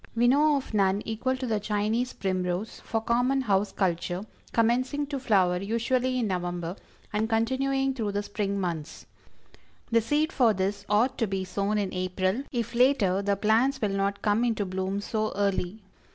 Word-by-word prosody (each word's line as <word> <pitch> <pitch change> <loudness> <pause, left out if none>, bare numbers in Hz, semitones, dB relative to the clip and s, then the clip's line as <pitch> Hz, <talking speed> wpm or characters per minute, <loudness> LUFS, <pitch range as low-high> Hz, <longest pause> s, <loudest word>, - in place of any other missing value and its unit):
We 240 +1 +3
know 295 +4 +4
of 270 -4 -4
none 200 0 +2
equal 245 +4 -1
to 260 - -4
THE 220 -3 0
CHINESE 215 +4 -1
PRIMROSE, 185 +2 -2
for 225 -1 -2
common 245 +4 +1
house 200 -4 +1
culture, 180 0 -1 0.3
commencing 255 +5 +1
to 280 -1 -4
flower 190 -8 +3
usually 245 +5 0
in 245 - +1
November, 175 -2 -3 0.4
and 215 +1 0
continuing 270 +4 +1
through 220 -6 -3
the 205 0 -1
spring 200 -1 -2
months. 165 -4 -4 0.9
The 230 0 +4
seed 295 +7 0
for 230 -5 +4
this 200 +2 -2
ought 215 +5 +2
to 225 - +1
be 195 -1 -2
sown 200 +3 -1
in 200 -2 -1
April 185 +4 -1
if 235 -2 -2
later 235 -7 +3
the 200 0 +1
plants 225 +7 +2
will 210 - 0
not 200 0 -1
come 210 +2 +2
into 225 -4 0
bloom 190 +1 -2
so 215 +1 -2
early. 200 0 -1
215 Hz, 170 wpm, -27 LUFS, 195-245 Hz, 0.9 s, know